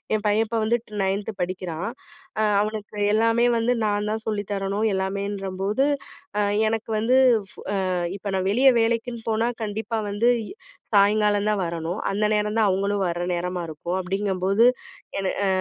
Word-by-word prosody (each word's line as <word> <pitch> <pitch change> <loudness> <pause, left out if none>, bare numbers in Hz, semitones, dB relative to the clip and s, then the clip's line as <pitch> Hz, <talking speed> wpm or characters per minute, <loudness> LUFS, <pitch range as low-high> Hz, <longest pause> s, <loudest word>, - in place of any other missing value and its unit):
என் 210 - -2
பையன் 210 +2 +3
இப்ப 230 +1 -1
வந்துட்டு 220 -2 -1
9த் 195 +3 -1
படிக்கிறான். 180 +1 -3 0.5
அ - - +3 0.2
அவனுக்கு 215 0 -4 0.2
எல்லாமே 230 +2 +3
வந்து 230 +2 +2
நான் 205 0 0
தான் 220 0 -3
சொல்லி 210 -2 -1
தரணும். 200 +2 0
எல்லாமேன்றம்போது, 195 +3 -1 0.5
அ - - +3 0.3
எனக்கு 225 0 -3
வந்து, 240 +4 +3 0.3
ஃப் - - -19 0.4
அ - - 0 0.2
இப்ப 200 0 -5
நான் 190 0 0
வெளிய 260 +6 +5
வேலைக்குன்னு 230 0 -1
போனா, 225 +2 +1
கண்டிப்பா 220 +2 -3
வந்து 215 +4 +2 0.2
இ - - -9 0.4
சாயங்காலம் 205 0 +4
தான் 210 -2 +1
வரணும். 170 +2 -3
அந்த 205 +2 -1
நேரம் 210 0 0
தான் 220 -2 +4
அவுங்களும் 200 +1 0
வர்ற 175 0 -2
நேரமா 180 +1 -2
இருக்கும், 170 +4 -3
அப்படிங்கும்போது, 195 +2 +1 0.6
என 195 - -1 0.2
அ - - +2
205 Hz, 160 wpm, -24 LUFS, 190-220 Hz, 0.6 s, வெளிய